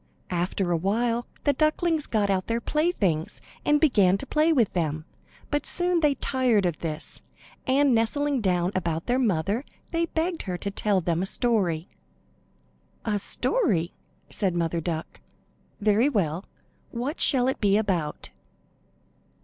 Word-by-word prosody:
After 180 Hz, +1 st, -1 dB
a 170 Hz, -, +2 dB
while 230 Hz, +6 st, 0 dB, 0.2 s
the 285 Hz, -, +3 dB
ducklings 310 Hz, +2 st, +1 dB
got 205 Hz, -3 st, +1 dB
out 185 Hz, -1 st, -1 dB
their 230 Hz, 0 st, 0 dB
play 305 Hz, +8 st, 0 dB
things 185 Hz, -, -1 dB, 0.2 s
and 295 Hz, 0 st, +3 dB
began 205 Hz, -, +4 dB
to 275 Hz, -, -7 dB
play 310 Hz, +3 st, +2 dB
with 245 Hz, -10 st, +2 dB
them, 155 Hz, -3 st, -2 dB, 0.5 s
but 290 Hz, 0 st, -1 dB
soon 355 Hz, -1 st, +3 dB
they 300 Hz, -3 st, +2 dB
tired 250 Hz, -9 st, +1 dB
of 175 Hz, -3 st, -1 dB
this, 155 Hz, -2 st, -5 dB, 0.5 s
and 275 Hz, 0 st, +3 dB
nestling 270 Hz, +4 st, +1 dB
down 180 Hz, -2 st, +1 dB
about 165 Hz, -3 st, -2 dB
their 245 Hz, +2 st, +1 dB
mother 205 Hz, -, 0 dB, 0.3 s
they 335 Hz, 0 st, 0 dB
begged 330 Hz, +1 st, -2 dB
her 180 Hz, -, -2 dB
to 200 Hz, -, -4 dB
tell 200 Hz, -1 st, +1 dB
them 170 Hz, 0 st, 0 dB
a 190 Hz, -, 0 dB
story. 190 Hz, -9 st, +1 dB, 1.2 s
"A 210 Hz, -2 st, 0 dB
story?" 195 Hz, -, +1 dB, 0.4 s
said 190 Hz, -4 st, +1 dB
Mother 170 Hz, -1 st, -1 dB
Duck. 160 Hz, 0 st, -4 dB, 0.6 s
"Very 215 Hz, +5 st, +3 dB
well. 180 Hz, -, -1 dB, 0.4 s
What 255 Hz, +6 st, -4 dB
shall 255 Hz, -3 st, +4 dB
it 265 Hz, -, -2 dB
be 200 Hz, -1 st, +4 dB
about?" 175 Hz, -, -2 dB
210 Hz, 150 wpm, -26 LUFS, 175-275 Hz, 1.2 s, began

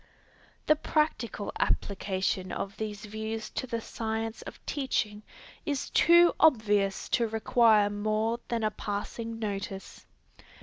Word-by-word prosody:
The 305 Hz, -, +5 dB
practical 300 Hz, -9 st, -1 dB
application 190 Hz, -1 st, -1 dB
of 195 Hz, 0 st, -4 dB
these 210 Hz, -1 st, -5 dB
views 220 Hz, +1 st, -5 dB
to 260 Hz, -, -3 dB
the 230 Hz, -1 st, -2 dB
science 225 Hz, 0 st, -4 dB
of -, -, -9 dB
teaching, 220 Hz, -7 st, -1 dB, 0.4 s
is 285 Hz, -3 st, -2 dB
too 345 Hz, 0 st, +6 dB
obvious 210 Hz, -9 st, +3 dB
to 235 Hz, -2 st, +2 dB
require 220 Hz, -1 st, +4 dB
more 215 Hz, +3 st, 0 dB
than 230 Hz, -2 st, -1 dB
a 215 Hz, -, +1 dB
passing 225 Hz, +3 st, -4 dB
notice. 195 Hz, -3 st, -5 dB
220 Hz, 120 wpm, -29 LUFS, 205-235 Hz, 0.4 s, too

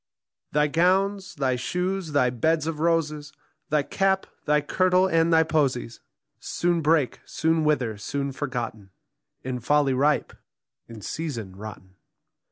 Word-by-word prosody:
Thy 150 Hz, 0 st, +3 dB
gowns, 190 Hz, +5 st, +1 dB
thy 135 Hz, -3 st, 0 dB
shoes, 180 Hz, +5 st, -2 dB
thy 125 Hz, -4 st, +3 dB
beds 155 Hz, +6 st, +1 dB
of 160 Hz, -2 st, -3 dB
roses, 155 Hz, -2 st, 0 dB, 0.4 s
Thy 150 Hz, -1 st, +2 dB
cap, 190 Hz, +4 st, +1 dB, 0.2 s
thy 150 Hz, 0 st, +3 dB
kirtle, 185 Hz, +5 st, +2 dB
and 165 Hz, -2 st, +2 dB
thy 160 Hz, 0 st, +6 dB
posies 140 Hz, -7 st, 0 dB, 0.4 s
Soon 175 Hz, -1 st, 0 dB
break, 155 Hz, -3 st, +2 dB
soon 160 Hz, 0 st, 0 dB
wither, 125 Hz, -9 st, 0 dB
soon 140 Hz, +6 st, -3 dB
forgotten, 120 Hz, -7 st, -5 dB, 0.5 s
In 130 Hz, -1 st, -3 dB
folly 145 Hz, +2 st, +2 dB
ripe, 145 Hz, +3 st, +1 dB, 0.6 s
in 110 Hz, -3 st, -10 dB, 0.2 s
reason 115 Hz, -, -4 dB
rotten. 95 Hz, -2 st, -10 dB
150 Hz, 130 wpm, -25 LUFS, 130-165 Hz, 0.6 s, thy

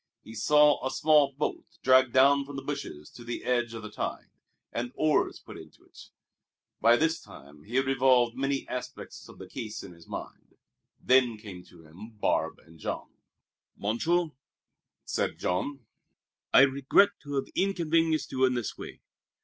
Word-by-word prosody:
He 110 Hz, -, -11 dB
saw 150 Hz, +6 st, +4 dB
a 130 Hz, -, 0 dB
small 145 Hz, 0 st, +3 dB
boat 145 Hz, +3 st, -4 dB
dragged 130 Hz, -1 st, +5 dB
down 140 Hz, +2 st, +5 dB
from 140 Hz, 0 st, -10 dB
the 135 Hz, -, -5 dB
bushes 140 Hz, -, -6 dB
to 120 Hz, -, -12 dB
the 120 Hz, 0 st, -5 dB
edge 120 Hz, -2 st, 0 dB
of 115 Hz, -, -7 dB
the 105 Hz, -, -8 dB
tide, -, -, -5 dB, 0.4 s
and 120 Hz, +1 st, -3 dB
oars 155 Hz, -1 st, +1 dB
put -, -, -12 dB
into -, -, -15 dB
it. -, -, -16 dB, 0.7 s
By 115 Hz, +1 st, +6 dB
this 160 Hz, +3 st, +1 dB
time 75 Hz, +2 st, -15 dB
he 120 Hz, -, -7 dB
had 135 Hz, +1 st, +3 dB
revolved 130 Hz, -3 st, +3 dB
many 135 Hz, +1 st, -2 dB
aspects 125 Hz, 0 st, -7 dB
of -, -, -14 dB
the -, -, -10 dB
case 110 Hz, -1 st, -6 dB
in -, -, -10 dB
his 85 Hz, -1 st, -18 dB
mind. -, -, -9 dB, 0.4 s
Then 125 Hz, -3 st, +3 dB
came 100 Hz, -4 st, -10 dB
to 80 Hz, -, -17 dB
him 95 Hz, +8 st, -13 dB
Barbe -, -, 0 dB
and 80 Hz, 0 st, -18 dB
Jean. -, -, -5 dB, 0.7 s
"Monsieur," 160 Hz, +11 st, 0 dB, 0.7 s
said -, -, -2 dB
Jean, 125 Hz, +8 st, -2 dB, 0.7 s
"I -, -, +8 dB
regret 140 Hz, +8 st, +4 dB
to 145 Hz, -1 st, -6 dB
have 135 Hz, -, -2 dB
inconvenienced 165 Hz, -4 st, +1 dB
you 130 Hz, -, 0 dB
in 130 Hz, -1 st, +1 dB
this 120 Hz, -3 st, -3 dB
way. -, -, -10 dB
130 Hz, 165 wpm, -28 LUFS, 115-145 Hz, 0.7 s, I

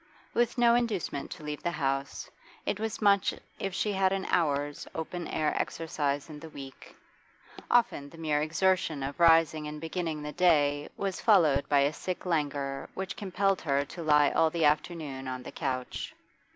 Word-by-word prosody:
With 240 Hz, +1 st, +1 dB
no 235 Hz, -1 st, +5 dB
inducement 220 Hz, -12 st, -1 dB
to 175 Hz, -4 st, -9 dB
leave 150 Hz, -1 st, -5 dB
the -, -, 0 dB
house, 135 Hz, -4 st, -2 dB, 0.3 s
it 205 Hz, -, -1 dB
was 220 Hz, 0 st, -3 dB
much 200 Hz, -2 st, +4 dB, 0.2 s
if 195 Hz, -1 st, -3 dB
she 210 Hz, +1 st, 0 dB
had 190 Hz, -1 st, +2 dB
an 195 Hz, -1 st, -1 dB
hour's 145 Hz, -4 st, 0 dB
open 165 Hz, +1 st, -4 dB
air 155 Hz, -1 st, 0 dB
exercise 145 Hz, -3 st, -2 dB
in 150 Hz, -2 st, -9 dB
the 160 Hz, -, -10 dB
week; 135 Hz, -3 st, -11 dB, 0.7 s
often 235 Hz, -12 st, +2 dB
the 165 Hz, -, -14 dB
mere 155 Hz, -2 st, 0 dB
exertion 160 Hz, -2 st, +1 dB
of 140 Hz, +3 st, -5 dB
rising 165 Hz, -2 st, +5 dB
and 150 Hz, 0 st, -6 dB
beginning 160 Hz, -1 st, -3 dB
the 150 Hz, -, -4 dB
day 145 Hz, -4 st, +3 dB
was 195 Hz, -2 st, -3 dB
followed 160 Hz, -11 st, +4 dB
by 145 Hz, -1 st, +5 dB
a 140 Hz, +2 st, +2 dB
sick 185 Hz, +4 st, -5 dB
languor 145 Hz, -5 st, -1 dB
which 190 Hz, -1 st, -4 dB
compelled 195 Hz, -1 st, 0 dB
her 140 Hz, -2 st, +1 dB
to 170 Hz, -, -9 dB
lie 150 Hz, -2 st, +4 dB
all 160 Hz, -, +3 dB
the 165 Hz, -1 st, +1 dB
afternoon 150 Hz, -3 st, -1 dB
on 130 Hz, -1 st, -4 dB
the -, -, -8 dB
couch. 130 Hz, -1 st, -4 dB
160 Hz, 175 wpm, -29 LUFS, 145-185 Hz, 0.7 s, no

